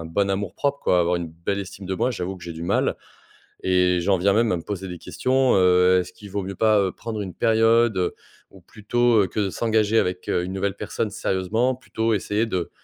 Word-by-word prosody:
un - - -7
bon 100 +5 0
amour-propre 100 +9 -1
quoi, 90 - +2
avoir 85 +1 +1
une 85 -1 -4
belle 85 +5 -3
estime 95 0 -7
de 95 - -2
moi, 125 - 0
j'avoue 95 -4 -4
que 90 - -12
j'ai 85 - -6
du 80 0 -8
mal 85 - 0 0.7
et 90 -1 +3
j'en 95 +2 +2
viens 100 +2 +2
même 115 +1 +2
à - - +1
me 85 - -6
poser 95 0 -5
des 90 -2 -7
questions. 130 +8 +1
Heu, 90 0 +5
est-ce 90 0 -3
qu'il 100 +2 -13
vaut 100 0 -3
mieux 95 +1 -5
pas, 110 +2 +3
heu, 95 -2 0
prendre 110 -2 -6
une 95 -4 -6
période? 115 0 +3
Heu, 90 -1 0 0.4
ou 95 - -16
plutôt, 115 +4 +1
heu, - - -1
que 105 - -3
de 100 -2 0
s'engager 110 0 +1
avec, 90 -2 -1
heu, 90 - 0
une 90 - -5
nouvelle 95 +1 -2
personne 105 - -3
sérieusement 110 +9 0
plutôt 115 -3 -2
essayer 105 +2 0
de 90 -6 -3
100 Hz, 235 wpm, -23 LUFS, 90-110 Hz, 0.7 s, Heu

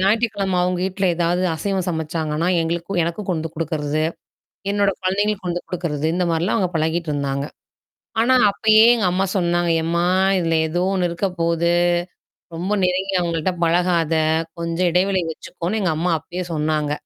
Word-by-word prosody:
ஞாயிற்றுக்கிழமை 200 -2 +1
அவங்க 180 0 0
வீட்ல 190 0 -1
ஏதாவது 175 +1 +1
அசைவம் 190 +2 -2
சமைச்சாங்கன்னா, 160 0 -2
எங்களுக்கு 170 +3 -2
எனக்கும் 185 +4 -4
கொண்டுண்டு 165 -2 -2
குடுக்கறது. 155 -1 -1 0.7
என்னோட 200 -1 +2
குழந்தைகளுக்கு 200 +1 0
கொண்டு 175 0 -2
குடுக்கறது. 160 -4 -3
இந்த 180 - +1
மாரிலாம் 170 +7 0
அவங்க 185 -4 0
பழகிட்டு 160 +1 0
இருந்தாங்க. 140 -1 -2 0.8
ஆனா 255 +3 +4 0.2
அப்பயே 215 +2 +5
எங்க 230 -4 -1
அம்மா 190 +1 +1
சொன்னாங்க, 175 -1 +1
எம்மா 170 +1 0 0.3
இதுல 165 -2 0
ஏதோ 175 +3 -1
ஒண்ணு 180 -2 +1
இருக்க 170 +4 -1
போது. 170 0 +1 0.9
ரொம்ப 185 +5 -2
நெருங்கி 185 +2 0
அவங்கள்ட்ட 170 0 -1
பழகாத. 170 -1 +2 0.5
கொஞ்சம் 170 +2 0
இடைவெளி 185 +1 +2
வச்சுக்கோனு 180 +7 -4
எங்க 180 -4 +1
அம்மா 175 0 +1
அப்பயே 175 +3 -6
சொன்னாங்க. 150 -1 0
175 Hz, 145 wpm, -21 LUFS, 165-190 Hz, 0.9 s, அப்பயே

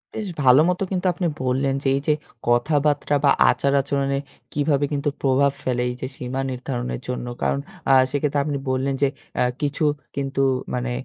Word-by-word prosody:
বেশ 215 -2 -3 0.2
ভালোমতো 155 +9 +5
কিন্তু 185 -1 -1
আপনি 175 +1 -1 0.2
বললেন 135 +1 +1
যে - - 0
এইযে 145 +2 +1 0.3
কথাবার্তা 145 +4 +2
বা 140 - +6 0.2
আচার 140 0 +1
আচরণে 140 0 -1 0.3
কিভাবে 145 -1 +1
কিন্তু 145 +1 0
প্রভাব 140 +1 +3
ফেলে 125 -1 0
এইযে 125 +1 -5
সীমা 130 +2 -3
নির্ধারণের 125 -1 -4
জন্য। 125 -1 -3
কারণ, 70 0 +1 0.3
আ - - +7 0.2
সেক্ষেত্রে 145 +1 0
আপনি 145 -2 -1
বললেন 130 +1 0
যে 140 - +5 0.3
আ - - +5 0.2
কিছু 145 +2 -1 0.3
কিন্তু 135 -1 -1 0.3
মানে 125 0 -2
140 Hz, 160 wpm, -23 LUFS, 130-145 Hz, 0.3 s, আ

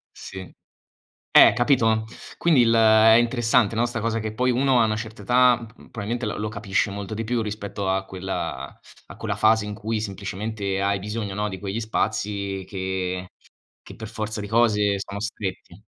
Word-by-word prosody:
Sì. 95 -1 -9 0.8
Eh, - - +8
capito? 115 -4 +2 0.3
Quindi 160 -7 +4
il 115 -1 +4
è 110 0 +6
interessante, 120 -2 +2
no, 115 +2 +2
sta 120 -1 -3
cosa 115 0 -1
che 110 0 -4
poi 125 +3 +1
uno 130 0 +3
a - - +4
una 110 -1 0
certa 110 0 -7
età 125 +3 +4
m 115 0 -14
p - - -24
probabilmente 115 +1 -3
l 105 - -3
lo 105 0 -2
capisce 105 -1 -1
molto 100 +1 -6
di 115 +1 -3
più 120 +1 -1
rispetto 100 -2 -5
a 95 0 0
quella 95 0 -5 0.3
a - - -12
quella - - -3
fase 110 -1 +3
in 105 - -5
cui 110 0 -3
semplicemente 100 0 -4
hai 100 0 +1
bisogno, 105 -1 -4
no, 105 0 -1
di 95 - -7
quegli 100 +2 -4
spazi 100 -3 -2
che 95 -1 -3 0.6
che - - -12
per 110 -1 -8
forza 110 -1 -4
di 105 - -6
cose 105 -2 +2
sono 100 +1 -6
stretti. 100 -3 -6
110 Hz, 185 wpm, -24 LUFS, 100-115 Hz, 0.8 s, Eh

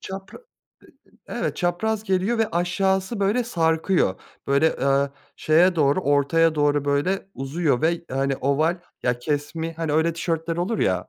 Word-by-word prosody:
Çapra 190 0 -8
Eee, 475 0 -29 0.7
eee, - - -6
evet - - -2
çapraz 205 +5 -1
geliyor 195 +4 0
ve 225 -1 +1
aşağısı 190 +4 0
böyle 210 +5 +1
sarkıyor. 160 - +1 0.3
Böyle, 140 +4 +2
eee, 140 +1 +2 0.3
şeye 175 +4 +3
doğru 145 +2 +3
ortaya 155 +2 +2
doğru 145 -1 +1
böyle 175 +8 0
uzuyor 135 -1 -1
ve 170 +1 +1
hani 135 +1 0
oval 155 +7 0 0.2
ya 125 -1 0
kesmi 150 +4 -3
hani 160 -2 -3
öyle 160 +2 +2
tişörtler 165 0 -2
olur 200 +6 -1
ya. 90 -1 0
165 Hz, 150 wpm, -23 LUFS, 145-185 Hz, 0.7 s, şeye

